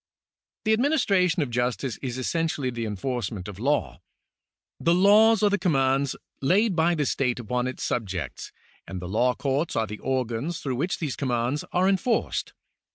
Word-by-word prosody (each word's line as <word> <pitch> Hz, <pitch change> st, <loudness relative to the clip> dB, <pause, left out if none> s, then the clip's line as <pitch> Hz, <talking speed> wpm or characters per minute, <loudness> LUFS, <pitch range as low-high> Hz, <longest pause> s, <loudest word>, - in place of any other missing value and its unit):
The 220 Hz, -, +4 dB
administration 200 Hz, -, +2 dB
of 130 Hz, -, -6 dB
justice 120 Hz, 0 st, -1 dB
is 130 Hz, -2 st, -5 dB
essentially 145 Hz, -1 st, -1 dB
the 120 Hz, -1 st, -4 dB
enforcement 105 Hz, -2 st, -3 dB
of 100 Hz, -3 st, -8 dB
the -, -, -10 dB
law. 145 Hz, +3 st, 0 dB, 0.8 s
The 170 Hz, +1 st, +3 dB
laws 215 Hz, +3 st, +5 dB
are 205 Hz, -, +4 dB
the 205 Hz, -, +1 dB
commands 135 Hz, -6 st, +1 dB, 0.3 s
laid 190 Hz, +8 st, +3 dB
by 170 Hz, +1 st, +3 dB
the 150 Hz, -3 st, 0 dB
state 125 Hz, -2 st, 0 dB
upon 125 Hz, +2 st, -1 dB
its 130 Hz, -, -5 dB
subjects, 95 Hz, -, -3 dB, 0.4 s
and 95 Hz, -, -5 dB
the 90 Hz, -, -6 dB
law 120 Hz, +6 st, +1 dB
courts 140 Hz, +3 st, -1 dB
are 110 Hz, -, +1 dB
the 105 Hz, 0 st, -8 dB
organs 130 Hz, +4 st, -2 dB
through 130 Hz, -3 st, -3 dB
which 175 Hz, +8 st, -1 dB
these 150 Hz, -6 st, -3 dB
commands 125 Hz, +1 st, -1 dB
are 180 Hz, +1 st, +2 dB
enforced. 195 Hz, +5 st, 0 dB
135 Hz, 165 wpm, -26 LUFS, 120-175 Hz, 0.8 s, laws